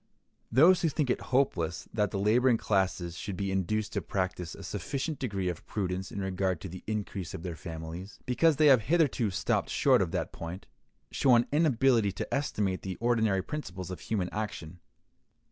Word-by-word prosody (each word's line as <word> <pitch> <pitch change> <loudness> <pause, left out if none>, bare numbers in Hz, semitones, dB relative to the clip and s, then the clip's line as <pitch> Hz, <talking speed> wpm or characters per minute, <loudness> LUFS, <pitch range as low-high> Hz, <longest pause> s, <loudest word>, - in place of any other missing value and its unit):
Those 170 +7 +6
who 165 - +2
think 145 -3 0
it - - -1
hopeless 90 - 0
that 105 -2 +1
the 100 - -3
laboring 115 +5 +3
classes 95 -5 0
should 95 +1 -5
be 100 0 -2
induced 100 +3 -1
to - - -1
practice 90 -3 -3
a - - -10
sufficient 145 +1 -3
degree 100 -8 -2
of 90 -2 -3
prudence 95 -2 -3
in 100 - -4
regard 95 -2 -1
to - - -5
the 90 +2 -9
increase 100 -5 -4
of 80 - -8
their 90 -3 -4
families, 80 +4 -7
because 155 +5 +3
they 155 +2 +3
have 135 -5 +7
hitherto 140 -4 +2
stopped 90 -1 0
short - - +4
of - - 0
that - - -2
point, 85 +3 -7 0.5
show 130 -3 +4
an 120 0 +4
inability 135 -8 +3
to - - -5
estimate 105 -9 -1
the 95 -1 -4
ordinary 110 -5 +1
principles 95 -12 -6
of 90 - -6
human 95 -5 -2
action. 90 -6 -5
100 Hz, 180 wpm, -29 LUFS, 90-125 Hz, 0.5 s, have